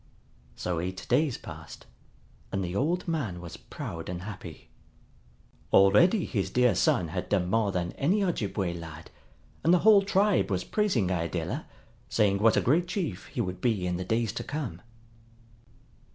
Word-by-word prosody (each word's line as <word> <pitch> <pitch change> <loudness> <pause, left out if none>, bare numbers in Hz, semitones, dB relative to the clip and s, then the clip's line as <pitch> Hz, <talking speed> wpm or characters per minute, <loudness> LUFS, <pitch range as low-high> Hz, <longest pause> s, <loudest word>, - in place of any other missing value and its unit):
So 90 -2 -2
eight 95 +2 -4
days 135 +1 +2
passed, - - -10 0.7
and 95 0 -1
the 90 +1 -4
old 170 - 0
man 135 - -2
was 85 -1 -8
proud 80 0 -7
and 90 0 -5
happy. 105 -1 -9 1.0
Already 105 - +5
his 100 -6 -2
dear 125 -1 +3
son 85 -3 +2
had 90 +3 -4
done 90 -3 +1
more 110 -2 +2
than 90 -2 -2
any 190 +9 +2
Ojibway 100 - -1
lad, 80 -2 -9 0.5
and 165 - +4
the 180 - +7
whole 210 -2 +8
tribe 200 - +2
was 95 -2 -1
praising 135 - +1
Iadilla, 85 -3 -2 0.4
saying 100 -3 +2
what 115 +1 +4
a - - +4
great 165 +8 +2
chief 170 - -3
he - - -3
would 90 -1 -4
be 110 -7 +1
in 90 -1 -1
the 90 - -3
days 115 +2 0
to - - -4
come. 135 - -5
100 Hz, 160 wpm, -28 LUFS, -, 1.0 s, whole